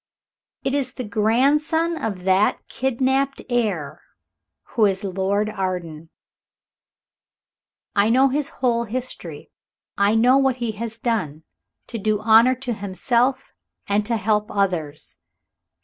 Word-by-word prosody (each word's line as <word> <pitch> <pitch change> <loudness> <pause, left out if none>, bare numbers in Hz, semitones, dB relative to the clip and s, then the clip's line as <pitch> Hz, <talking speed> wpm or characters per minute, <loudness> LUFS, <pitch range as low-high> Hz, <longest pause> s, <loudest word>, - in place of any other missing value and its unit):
It 270 - -1
is 270 -3 -1
the 255 - -5
grandson 280 +10 +1
of 200 - -4
that 190 +2 +2
kidnapped 265 +2 0
heir 205 -12 -1 0.7
who 220 -3 +3
is 195 0 -2
Lord 195 +2 0
Arden. 180 -6 -4 1.9
I 200 +1 +4
know 260 +3 +4
his 285 +2 -1
whole 235 -2 0
history. 250 +3 -6 0.5
I 200 +2 +3
know 250 +4 +5
what 265 -2 +2
he 240 -3 -3
has 225 +1 -6
done, 180 - -2 0.4
to 230 - -6
do 215 0 0
honor 225 +4 +5
to 255 -1 -4
himself 235 +6 -1 0.3
and 205 +1 +1
to 230 -1 0
help 210 +1 0
others." 175 -7 -2
225 Hz, 120 wpm, -22 LUFS, 200-255 Hz, 1.9 s, know